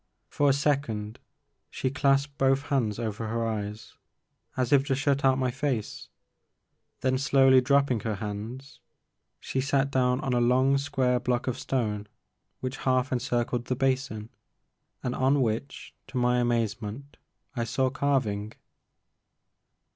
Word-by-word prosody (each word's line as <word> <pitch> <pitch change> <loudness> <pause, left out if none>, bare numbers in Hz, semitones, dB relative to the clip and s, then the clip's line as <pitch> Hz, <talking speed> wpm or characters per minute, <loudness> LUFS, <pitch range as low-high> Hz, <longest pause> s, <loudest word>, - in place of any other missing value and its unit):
For 145 -1 +2
a - - +5
second 135 -7 -1 0.5
she 130 - -2
clasped 140 +1 +1
both 135 +1 +3
hands 125 -8 0
over 110 -1 -3
her 115 +1 -1
eyes 105 -1 -4 0.6
as 130 +1 +1
if 135 -1 +5
to 135 - +2
shut 140 0 +1
out 130 -1 +4
my 130 -1 0
face, 135 -4 -3 0.9
then 130 0 +1
slowly 135 -2 +5
dropping 140 -2 +2
her 110 0 -2
hands, 110 +7 -7 0.6
she 130 - -2
sat 135 +1 +1
down 125 -1 +2
on 135 -4 -1
a 120 - +2
long 130 +3 +3
square 130 -3 +1
block 125 0 -1
of 125 -1 -2
stone 105 -5 -2 0.5
which 130 +1 -4
half 130 0 +1
encircled 120 -1 -1
the 130 - -1
basin, 130 -4 -1 0.7
and 125 - -1
on 135 +3 +2
which 115 +2 -2
to 130 - -6
my 125 0 +2
amazement 120 +2 -2 0.4
I 120 - -1
saw 130 +3 0
carving. 125 -7 -1
130 Hz, 140 wpm, -27 LUFS, 115-135 Hz, 0.9 s, a